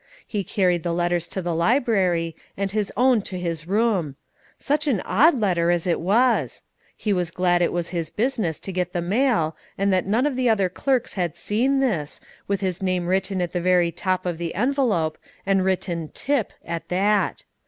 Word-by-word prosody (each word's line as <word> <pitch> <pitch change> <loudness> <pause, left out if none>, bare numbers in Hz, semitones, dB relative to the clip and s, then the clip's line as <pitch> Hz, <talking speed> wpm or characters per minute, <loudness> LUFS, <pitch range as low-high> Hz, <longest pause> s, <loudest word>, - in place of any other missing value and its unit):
He 205 -3 -3
carried 180 -2 +1
the 170 0 -2
others 175 -1 0
to 190 - -4
the 175 0 -1
library, 180 - +1 0.2
and 195 0 -2
his 210 -1 -1
own 250 -3 +4
to 190 -1 -6
his 165 -2 -4
room. 195 -8 +1 0.4
Such 300 +1 -1
an 245 -9 +2
odd 280 - +4
letter 175 -5 +1
as 175 -1 +1
it 175 -2 +1
was! 230 +8 +2 0.3
He 210 - 0
was 180 -3 0
glad 175 0 +1
it 175 - +2
was 175 -1 -2
his 165 -3 -3
business 215 - -1
to 195 - -5
get 180 -1 -2
the 175 - -1
mail, 200 - +1 0.2
and 195 0 +2
that 185 0 +1
none 225 +7 +2
of 295 -3 0
the 250 -1 +2
other 200 -4 +2
clerks 255 +6 -1
had 175 -5 -2
seen 260 +6 +1
this, 170 - -1 0.3
with 200 0 -1
his 185 -2 -2
name 185 -2 0
written 190 +1 0
at 175 - -3
the 175 - -2
very 175 -1 +3
top 185 +1 -2
of 175 -2 -2
the 170 -1 -4
envelope, 225 - +1 0.3
and 195 -1 +2
written 175 -4 -1
"Tip" 275 -6 0
at 165 -1 -5
that. 200 +3 +1
185 Hz, 195 wpm, -23 LUFS, 175-220 Hz, 0.4 s, own